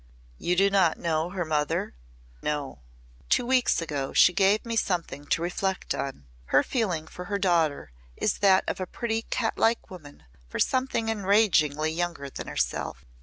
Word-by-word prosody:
"You 180 - 0
do 195 +2 +4
not 185 -5 +3
know 160 0 -1
her 180 -2 -3
mother?" 150 -2 -1 0.5
"No." 145 - -3 0.5
"Two - - +3
weeks 250 -9 +2
ago 145 -4 -3
she 180 - +6
gave 200 +4 +3
me 230 0 -3
something 170 -9 -2
to 165 - 0
reflect 190 +2 -2
on. 135 - -5 0.2
Her 135 - +3
feeling 185 - -1
for 180 +3 -9
her 200 +2 -2
daughter 165 - +1 0.3
is 210 - 0
that 195 -2 +5
of - - -2
a 185 - -3
pretty 225 -2 -2
cat 225 0 -2
like 230 -2 +1
woman 150 -6 -12 0.3
for - - -5
something 255 -3 0
enragingly 190 -8 +2
younger 165 -4 -3
than - - -7
herself. 65 +3 -3
180 Hz, 165 wpm, -27 LUFS, 155-205 Hz, 0.5 s, she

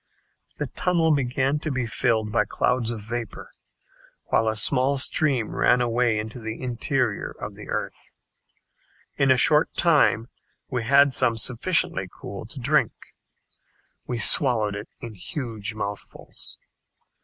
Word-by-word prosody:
The - - -2
tunnel 170 -3 0
began 135 0 0
to 155 - -5
be 130 -4 -2
filled 110 -2 -1
by 105 -1 +1
clouds 125 +2 -1
of 115 -3 -5
vapor, 115 +1 -6 0.8
while 110 - +2
a 110 - 0
small 130 +5 +3
stream 135 -4 +1
ran 125 0 +3
away 120 -2 +1
into 110 +3 -6
the 110 -1 -6
interior 125 -2 -2
of - - -6
the - - -12
earth. - - -5 1.1
In 140 - +2
a 130 - +5
short 150 +4 +4
time 145 -8 +3 0.4
we 125 -3 -2
had 140 +2 +4
some 120 -4 +2
sufficiently 120 - 0
cool 100 +2 -9
to 130 - -10
drink. 145 +4 +1 1.1
We 120 - -3
swallowed 110 -3 +5
it 105 +1 -8
in 115 -2 -8
huge 110 - -5
mouthfuls. 100 -1 -6
120 Hz, 135 wpm, -24 LUFS, 110-135 Hz, 1.1 s, a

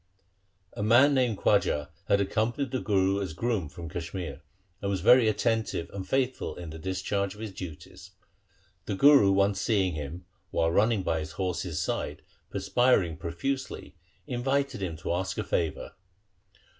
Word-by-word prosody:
A - - -5
man 125 +7 +5 0.2
called - - +3
Khwaja 75 0 -2 0.2
had 100 - +3
accompanied 115 +6 -1
the 130 - -1
Guru 95 0 +1
as 95 -5 -4
groom 100 -3 -1
from 85 +2 -8
Kashmir, 85 -3 -5 0.4
and 100 - -2
was 95 -3 -1
very 120 +4 +6
attentive 110 -4 -1
and 95 -1 -6
faithful 130 0 0
in 85 -3 -8
the 80 - -8
discharge 95 +3 -2
of - - -14
his 110 -2 -5
duties. 90 0 -9 0.8
The 100 - -1
Guru 140 -3 +6
once 100 0 +2
seeing 95 -6 +1
him, 75 +4 -6 0.2
while 80 -2 +1
running 105 +2 +2
by 80 -2 0
his 80 0 -6
horse's 90 -3 -2
side, - - -3 0.3
perspiring 115 -10 +2
profusely, 130 +11 -4 0.3
invited 135 -1 -1
him 85 -4 -3
to 85 - -3
ask 95 +1 -2
a - - -1
favour. 80 -4 -2
95 Hz, 155 wpm, -28 LUFS, 85-115 Hz, 0.8 s, very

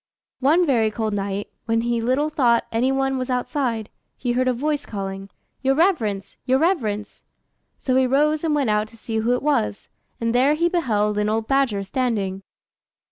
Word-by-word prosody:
] - - -71
One 345 +4 +4
very 235 -7 +2
cold 215 0 -2
night, 200 0 -3 0.2
when 230 0 +1
he 235 0 0
little 260 +6 +1
thought 245 -6 +2
any 245 +4 +1
one 270 0 0
was 255 +1 -3
outside, 250 -3 -1 0.3
he 245 - -1
heard 255 +1 +1
a - - +4
voice 290 +4 -1
calling 195 -1 -6 0.3
"Your 270 0 +2
reverence! 230 - 0
your 260 +1 +2
reverence!" 225 - -1 0.5
So 255 - -1
he 260 0 +4
rose 300 +4 +2
and 315 -2 +1
went 275 -7 +1
out 210 0 +1
to 230 +1 -17
see 220 0 -4
who 235 +3 +2
it 250 - -4
was, 105 - 0 0.3
and 230 0 0
there 265 +5 +4
he 340 +2 +2
beheld 210 - +1
an 210 0 +1
old 220 0 -1
badger 270 -8 +1
standing. 200 -3 -1
245 Hz, 190 wpm, -22 LUFS, 215-275 Hz, 0.5 s, One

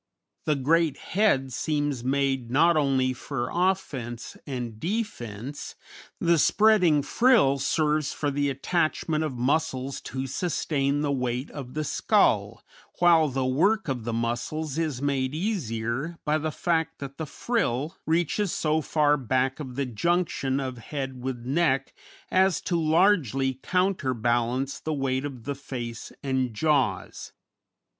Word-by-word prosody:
The 155 -2 +2
great 155 +2 +2
head 155 - +1
seems 145 -5 -1
made 135 -2 0
not 165 +7 +4
only 135 -3 +2
for 130 0 -4
offence 140 -11 -1
and 120 -5 -5
defence; 145 - -4 0.4
the 170 -1 +3
spreading 180 -6 +4
frill 145 - +4
serves 150 +1 +1
for 145 -1 -2
the 145 0 0
attachment 155 +2 0
of 140 -5 -3
muscles 135 0 -1
to 130 0 -4
sustain 140 -1 -1
the 145 -1 0
weight 125 0 -2
of 135 -3 -8
the 155 - -1
skull, - - +2 0.3
while 170 -3 +5
the 135 -1 -1
work 185 +10 +2
of 130 -5 -2
the 120 - -3
muscles 125 +7 -2
is 150 -5 -2
made 135 -1 0
easier 150 - -2
by 155 0 +2
the 155 +1 -2
fact 160 0 -1
that 140 +1 -8
the 160 - -3
frill 155 - -1
reaches 170 +4 +1
so 155 0 +1
far 150 -1 +2
back 130 +1 0
of 130 -4 -7
the 140 +1 -1
junction 140 +1 0
of 130 -3 -4
head 135 0 -5
with 125 -2 -4
neck 135 -1 +1 0.4
as 190 -1 +3
to 175 - -1
largely 155 - +2
counterbalance 130 - 0
the 155 - -3
weight 135 -1 -1
of 130 -5 -7
the 140 - -3
face 120 -4 -6
and 130 -4 -1
jaws. 130 - 0
140 Hz, 135 wpm, -26 LUFS, 130-160 Hz, 0.4 s, while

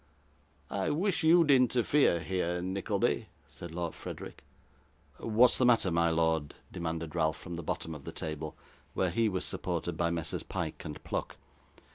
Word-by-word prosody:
'I 95 -1 0
wish 180 +5 +1
you'd 165 -1 +6
interfere 125 - +4
here, 90 -1 -1
Nickleby,' 95 +2 0 0.2
said 85 - -9
Lord 85 0 -3
Frederick. - - -8 0.8
'What 115 +2 +5
is - - -1
the 130 - +4
matter, 115 -6 +4
my 85 0 +3
lord?' 80 -2 +1 0.2
demanded 85 -2 -4
Ralph 80 -2 +1
from 90 - -8
the 85 - -4
bottom 80 +1 -3
of 75 -3 -9
the - - -6
table, 80 -1 -5 0.4
where 95 -2 +1
he 115 +4 +2
was 95 -2 -2
supported 85 -2 -2
by 85 0 +2
Messrs 85 -2 -2
Pyke - - -4
and 75 - -7
Pluck. - - -3
85 Hz, 160 wpm, -31 LUFS, 80-115 Hz, 0.8 s, you'd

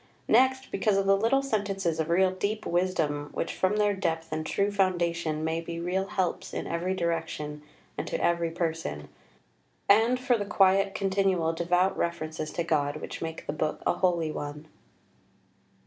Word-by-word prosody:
Next 260 +3 +3
because 210 -3 +1
of 195 - +1
the 195 0 +5
little 230 +7 +2
sentences 195 -9 -1
of 160 0 -1
real 185 +2 +4
deep 205 +3 -2
wisdom 160 -5 0
which - - -2
from 185 +2 +1
their 205 -1 +3
depth 165 -4 -2
and 155 0 -2
true 200 +5 0
foundation 170 -5 0
may 160 +1 -1
be 170 0 -6
real 185 +3 -1
helps 185 -2 -2
in - - -3
every 175 +3 -1
direction 165 -4 -3 0.4
and - - -3
to - - -2
every 170 -1 +1
person; 165 - -3 0.8
and 225 +5 +5
for 250 -2 +2
the 205 - -2
quiet 195 0 +3
continual 190 -4 +1
devout 180 +3 +1
references 155 -2 -3
to 170 - -1
God 145 -3 0
which 155 - -7
make 160 0 -5
the - - -3
book 155 0 -2
a - - +3
holy 170 -4 +1
one." 145 +1 -6
175 Hz, 165 wpm, -28 LUFS, 160-195 Hz, 0.8 s, the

